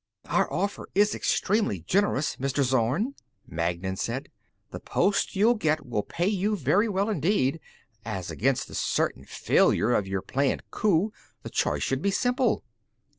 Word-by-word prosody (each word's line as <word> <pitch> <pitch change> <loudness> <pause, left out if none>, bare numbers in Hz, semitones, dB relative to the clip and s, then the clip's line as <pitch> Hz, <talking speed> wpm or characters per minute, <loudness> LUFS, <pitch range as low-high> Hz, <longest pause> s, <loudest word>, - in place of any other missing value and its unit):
"Our - - +1
offer 200 0 -2
is 205 +1 +4
extremely 200 - 0
generous, 165 - +1
Mr. 135 +1 0
Zorn," 130 - +1 0.3
Magnan 85 +3 -2
said. - - -3 0.4
"The - - -6
post 200 0 0
you'll 215 +5 +5
get 155 -9 0
will 115 -4 -1
pay 170 +10 -3
you 205 +1 +1
very 190 - +2
well 200 0 0
indeed. 165 -6 +1 0.4
As 95 -5 -4
against 130 +3 0
the - - -12
certain - - -1
failure 120 - +2
of 100 -4 +1
your 95 -1 -2
planned 135 +5 0
coup, 205 +1 +1 0.3
the - - -7
choice - - 0
should 135 +1 -1
be 200 - +1
simple." 245 +5 +1
155 Hz, 150 wpm, -27 LUFS, 120-205 Hz, 0.4 s, you'll